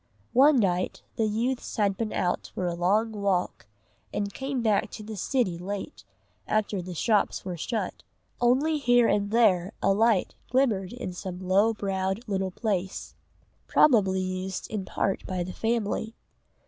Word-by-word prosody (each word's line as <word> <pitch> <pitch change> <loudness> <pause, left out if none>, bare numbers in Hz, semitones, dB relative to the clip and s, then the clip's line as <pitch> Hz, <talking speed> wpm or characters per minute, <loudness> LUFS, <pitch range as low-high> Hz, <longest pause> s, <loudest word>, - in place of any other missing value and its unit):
One 280 +3 +6
night 185 -5 0
the 220 - +1
youths 235 +4 -2
had 200 -3 +2
been 220 +1 -3
out 175 - -1
for 185 - -2
a 175 - 0
long 200 +6 +1
walk 200 - -1 0.4
and 200 -1 -2
came 265 -2 -3
back 215 -3 +2
to 215 - -7
the 215 +1 -7
city 200 -5 0
late, 200 +9 -6 0.4
after 210 -2 0
the 180 0 -7
shops 210 +3 +1
were 180 -2 -3
shut. 215 +7 -3 0.4
Only 275 +6 +3
here 245 -3 +4
and 200 -1 +1
there 205 -4 +3
a 195 - +3
light 220 -1 +2 0.2
glimmered 225 -8 +1
in 240 -7 -5
some 180 0 -6
low 195 +5 +2
browed 195 +1 -2
little 190 -2 -1
place, 190 -1 -3 0.5
probably 195 -9 +4
used 185 0 -3
in 205 -3 -3
part 195 - -1
by 185 -1 -2
the 180 +1 -6
family. 225 -1 -1
205 Hz, 155 wpm, -27 LUFS, 185-230 Hz, 0.5 s, One